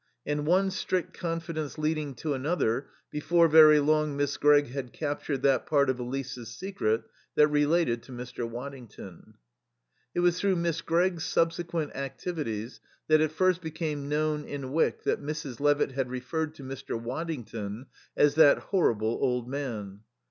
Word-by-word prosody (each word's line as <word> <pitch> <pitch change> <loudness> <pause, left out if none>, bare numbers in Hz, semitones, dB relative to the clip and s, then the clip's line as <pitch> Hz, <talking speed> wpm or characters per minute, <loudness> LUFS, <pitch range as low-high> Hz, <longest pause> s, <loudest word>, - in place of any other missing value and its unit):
And 145 0 -2
one 190 +3 +3
strict 185 -1 -2
confidence 165 -3 -4
leading 155 -2 -1
to 150 +5 -2
another, 135 -3 0 0.2
before 165 +3 +3
very 155 -1 +8
long 150 0 +1
Miss 145 0 0
Gregg 145 -2 +4
had 130 -1 -6
captured 145 -2 -3
that 135 -3 +3
part 140 -3 +3
of 125 - -6
Elise's 125 -1 -5
secret 115 - -2 0.3
that 150 0 +5
related 150 -4 +2
to 130 - -14
Mr. 120 -1 -5
Waddington. 120 -7 -9 0.8
It 175 - +2
was 175 0 +3
through 195 -2 +2
Miss 170 -1 -1
Gregg's 175 0 +1
subsequent 165 -2 -1
activities 135 - -4 0.3
that 155 0 +6
it 155 -1 +1
first 185 +2 +2
became 155 -3 -4
known 150 0 0
in 140 -3 -6
Wyck 160 +3 +1
that - - 0
Mrs. 145 -4 -5
Levitt 145 -1 +2
had 130 -1 -2
referred 155 +5 -3
to 140 - -11
Mr. 130 -3 -5
Waddington 120 -5 -5 0.3
as 145 -1 +5
"that 150 -2 +7
horrible 115 - 0
old 125 -3 0
man." 115 -8 -5
145 Hz, 150 wpm, -28 LUFS, 130-160 Hz, 0.8 s, very